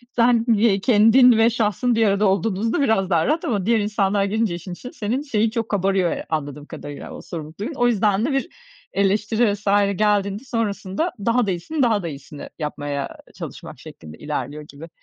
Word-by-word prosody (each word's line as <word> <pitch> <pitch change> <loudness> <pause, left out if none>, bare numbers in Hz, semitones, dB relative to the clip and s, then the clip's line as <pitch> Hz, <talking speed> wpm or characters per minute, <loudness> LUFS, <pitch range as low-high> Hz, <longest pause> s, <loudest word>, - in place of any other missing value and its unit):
Sen, 235 -1 +3
ye 205 -2 +3
kendin 235 +2 +6
ve 225 +1 +5
şahsın 230 +1 0
bir 225 -1 +3
arada 200 +1 +2
olduğunuzda 200 - 0
biraz 220 -8 +2
daha 165 -3 +2
rahat 320 +4 0
ama 210 - -1
diğer 230 +1 +3
insanlar 205 -1 +1
girince 210 -2 0
işin 175 +1 -7
içine 250 +7 -9
senin 225 +6 -2
şeyin 225 -7 0
çok 230 -1 -3
kabarıyor 195 -3 +1
ya - - -4
anladığım 145 -2 -4
kadarıyla, 145 -2 -9
o - - -9
sorumluluk 160 0 -8
duygun. 220 +10 -4
O 245 -1 +2
yüzden 210 -2 +2
de 290 - -1
bir 270 +6 -1 0.4
eleştiri 205 +3 +1
vs. 205 0 -9 0.3
geldiğinde 205 0 +1
sonrasında 215 - -2
daha 230 +4 +1
da - - +1
iyisini, 265 - -2
daha 220 -5 +2
da - - -3
iyisini 145 -1 -9
yapmaya 145 -2 -4 0.2
çalışmak - - -9
şeklinde 75 -1 -12
ilerliyor 150 0 -5
gibi. 150 +3 -12
205 Hz, 185 wpm, -22 LUFS, 175-230 Hz, 0.4 s, kendin